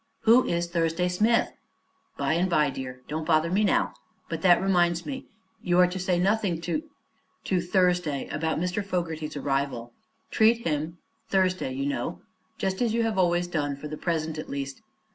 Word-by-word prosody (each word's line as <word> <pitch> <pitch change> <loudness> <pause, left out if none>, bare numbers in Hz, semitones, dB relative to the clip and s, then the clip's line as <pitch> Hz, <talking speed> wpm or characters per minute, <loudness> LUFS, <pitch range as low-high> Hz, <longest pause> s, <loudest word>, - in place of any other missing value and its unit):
"Who 235 +3 +5
is 170 0 0
Thursday 170 0 0
Smith?" 220 +6 +2 0.7
"By - - +1
and 175 +3 +1
by, 150 -4 +3
dear. 130 -1 -7
Don't 155 +2 -3
bother 165 0 +3
me 200 +3 +2
now. 205 - +2 0.4
But - - -3
that 175 -2 +6
reminds 175 -2 +2
me; 270 -2 -6 0.3
you 175 -1 +1
are 180 - +7
to 180 +1 -3
say 180 -1 +1
nothing 195 -2 +1
to 175 - -1 0.6
to 185 -2 0
Thursday 180 -5 +1
about 160 +2 -1
Mr. 180 +4 -1
Fogerty's 165 -6 -3
arrival. 135 -4 -2 0.4
Treat 225 +1 +3
him 155 +2 -2 0.3
Thursday, 185 - +1
you 135 +1 -2
know 140 - -2 0.4
just 190 +2 -2
as 230 -2 +1
you 235 - +2
have 220 -4 0
always 175 -1 +2
done, 150 -5 -2
for 140 +2 -8
the 155 - -5
present, 160 -1 -2
at - - -7
least. 140 +5 -5
175 Hz, 175 wpm, -27 LUFS, 155-185 Hz, 0.7 s, are